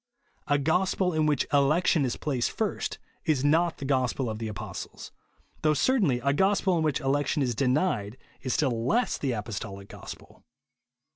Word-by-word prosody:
A 145 - +3
gospel 180 +5 +1
in 155 -1 +2
which 145 -3 +2
election 150 +2 +3
is 125 - -2
placed 130 -6 -1
first - - -2 0.3
is 145 -4 +1
not 165 +3 +3
the 140 - -6
gospel 130 -2 0
of 110 - -6
the 115 - -3
apostles; 105 -2 -7 0.5
though 155 -1 +3
certainly 190 - +2
a 140 +2 +2
gospel 190 +2 +2
in 165 - +1
which 150 -4 0
election 145 +1 +1
is 125 -2 0
denied 125 - 0 0.2
is 130 - -1
still 125 -7 0
less 240 - +1
the 135 -3 -1
apostolic 100 -2 -6
gospel. - - -11
140 Hz, 160 wpm, -27 LUFS, 125-160 Hz, 0.5 s, A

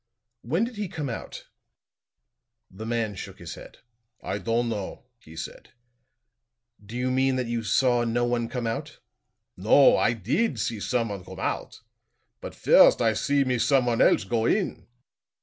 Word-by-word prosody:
"When 160 - 0
did 235 -1 -4
he 205 -1 -2
come 150 -5 -5
out?" 115 - -7 1.3
The 110 +4 -8
man 115 -3 -1
shook 95 - -8
his - - -8
head. - - -12 0.5
"I 100 - -3
don'd 115 +4 0
know," 105 +1 -5
he 80 -7 -15
said. 80 - -9 1.1
"Do 110 +4 -8
you 125 +1 -1
mean 130 0 +2
that 130 -1 -1
you 120 0 -2
saw 120 +3 +2
no 120 +1 0
one 120 -1 -1
come 125 -2 -4
out?" 115 0 -4 0.6
"No; 110 +9 +5
I - - +2
did 125 - -1
see 110 +1 -2
someone 105 -4 -2
come - - -10
out. - - -4 0.6
But - - -8
first - - +6
I 115 -2 +2
see 140 +5 +1
me 125 -2 -1
someone 125 -3 +2
else - - +4
go 110 +4 0
in." 200 -3 -1
120 Hz, 160 wpm, -26 LUFS, 110-130 Hz, 1.3 s, first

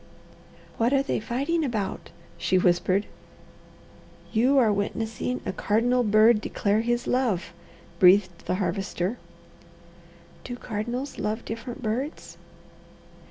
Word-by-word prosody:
"What 235 +4 +2
are 275 0 +3
they - - -1
fighting 275 +9 -1
about?" 220 -8 -3 0.3
she 185 - +1
whispered. 185 +2 +2 1.3
"You 250 +5 +3
are 225 -5 +4
witnessing 225 +4 -2
a - - -2
cardinal 235 +7 +1
bird 215 0 +5
declare 205 +1 0
his 240 +1 -1
love," 220 -9 0 0.5
breathed 185 -1 +4
the - - +1
Harvester. 185 +3 -2 1.2
"Do 245 - -6
cardinals 240 +4 -4
love 215 +2 -2
different 230 +3 -6
birds?" 250 +8 -4
225 Hz, 110 wpm, -26 LUFS, 200-245 Hz, 1.3 s, bird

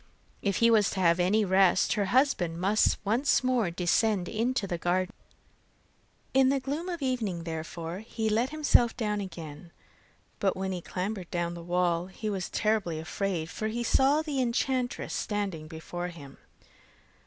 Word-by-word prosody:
If 200 -2 0
he 230 +3 +4
was 215 -3 +4
to 190 - -4
have 170 -1 +3
any 205 +4 +3
rest, 190 -1 +4
her 205 -2 0
husband 195 - +1
must 200 +4 +3
once 245 +7 +2
more 250 -7 +2
descend 180 +3 +1
into 230 0 0
the 175 -3 -3
garden. 180 +2 0 1.2
In 265 0 +5
the 275 0 +2
gloom 290 +7 -4
of 340 -5 -4
evening 220 -10 -1
therefore, 165 +1 -5
he 220 +1 -3
let 225 +4 +1
himself 295 -6 +3
down 210 -3 -1
again; 165 -3 -8 0.7
but 195 -2 +1
when 190 0 -2
he 185 - -2
had - - -17
clambered 190 -1 -4
down 170 -1 -2
the 170 - -8
wall 175 0 0
he 210 +3 -4
was 190 -3 -3
terribly 210 -7 0
afraid, 165 +1 -3
for 215 - -3
he 235 +2 -2
saw 275 +6 +3
the 290 -4 -1
enchantress 250 +1 -1
standing 195 -7 -3
before 175 +2 -6
him. 150 -6 -11
195 Hz, 165 wpm, -28 LUFS, 175-235 Hz, 1.2 s, In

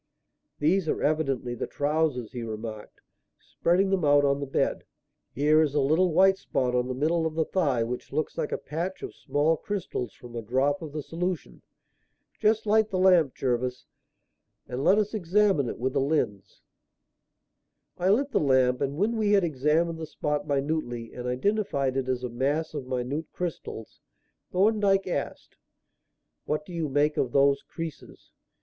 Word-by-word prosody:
"These 160 +3 +1
are - - -1
evidently 135 -5 0
the 120 - -4
trousers," 145 -6 -1
he 125 - -5
remarked, 110 -1 -7 0.4
spreading 190 +3 +1
them 190 -3 +1
out 145 -1 +5
on 140 0 +2
the 140 - -4
bed. 135 - 0 0.5
"Here 150 +4 +3
is 150 -2 0
a - - +3
little 160 +6 +3
white 190 +3 +4
spot 125 -9 -1
on 125 0 +1
the 130 - -3
middle 160 +4 +1
of 155 - -6
the 160 -1 +1
thigh 140 -11 +1
which 120 +2 -5
looks 155 - -2
like 150 - -2
a - - 0
patch 170 +5 -5
of - - -6
small 155 +3 +1
crystals 175 - -4
from 120 -1 -12
a 115 - -3
drop 130 +6 0
of 155 -3 -7
the 150 0 -5
solution. 175 +3 -4 0.8
Just 220 0 +2
light 215 0 +3
the 190 - -2
lamp, 180 -7 +4
Jervis, 125 0 -2 0.8
and 125 +2 -4
let 195 - +5
us 210 0 0
examine 195 - +2
it - - -5
with 130 +2 -2
a - - +3
lens." 105 -9 -1 1.4
I 180 +2 +2
lit 275 +8 +2
the - - +2
lamp, 130 -3 +3
and 140 +1 -1
when 220 +6 +1
we 210 -2 +2
had 200 -2 +4
examined 160 +2 +1
the 160 - -5
spot 150 -1 -2
minutely 140 -5 -2
and 125 0 -6
identified 140 -1 0
it 135 -1 -1
as 130 -1 -1
a 125 - -2
mass 140 +7 -1
of 140 -4 -5
minute 130 +5 -3
crystals, 165 -10 -6 0.5
Thorndyke 195 0 +3
asked: 180 - -4 0.9
"What 150 0 -2
do 180 - -10
you 165 -3 -2
make 145 +2 +1
of 125 - 0
those 140 0 +4
creases? 165 -3 -9
150 Hz, 170 wpm, -27 LUFS, 130-180 Hz, 1.4 s, out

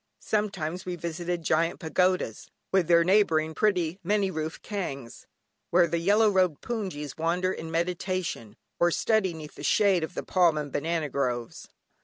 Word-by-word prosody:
Sometimes 185 -5 -2
we 180 -1 -4
visited 170 0 -4
quaint 165 +3 +1
pagodas, 180 - 0 0.2
with 190 -4 +2
their 170 -1 +5
neighbouring 165 -5 +3
pretty, 180 -3 +1
many 195 +1 +1
roofed 160 -1 -5
kyaungs 140 - -6 0.4
where 175 0 +5
the 170 0 -1
yellow 205 +6 +4
robed 185 -6 +2
hpoongyis, 185 - -4
wander 175 +3 +1
in 160 - -7
meditation, 170 - -2 0.2
or 175 - +4
study 215 +1 +1
'neath 155 -2 -9
the - - -11
shade 195 -5 +3
of 160 - -5
the - - -3
palm 175 -4 +3
and 145 -2 -4
banana 160 +2 -1
groves. 125 -4 -3
170 Hz, 155 wpm, -27 LUFS, 155-185 Hz, 0.4 s, their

